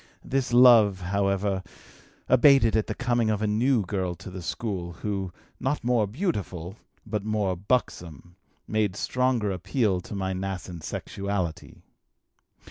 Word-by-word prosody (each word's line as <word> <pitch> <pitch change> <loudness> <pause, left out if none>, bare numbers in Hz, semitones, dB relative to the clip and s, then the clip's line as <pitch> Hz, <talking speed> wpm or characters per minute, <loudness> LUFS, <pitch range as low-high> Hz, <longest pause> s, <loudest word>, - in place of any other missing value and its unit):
This 135 -2 -1
love, 120 -6 +7
however, 100 +1 0 0.7
abated 130 -3 +5
at 110 - +1
the - - -3
coming 120 -4 +1
of 105 -2 0
a 110 - -1
new 110 +1 +2
girl 90 -2 -2
to 90 - -10
the 90 0 -7
school, 90 -1 -4
who, 95 0 -4 0.3
not 135 +3 -1
more 120 -3 +2
beautiful, 100 - -3 0.3
but 105 -2 -3
more 105 -3 0
buxom, 90 - -3 0.3
made 105 -3 0
stronger 125 -2 0
appeal 95 - 0
to 100 - -8
my 95 -1 -2
nascent 90 -3 -5
sexuality. 95 -3 -4
100 Hz, 130 wpm, -26 LUFS, 95-120 Hz, 0.7 s, love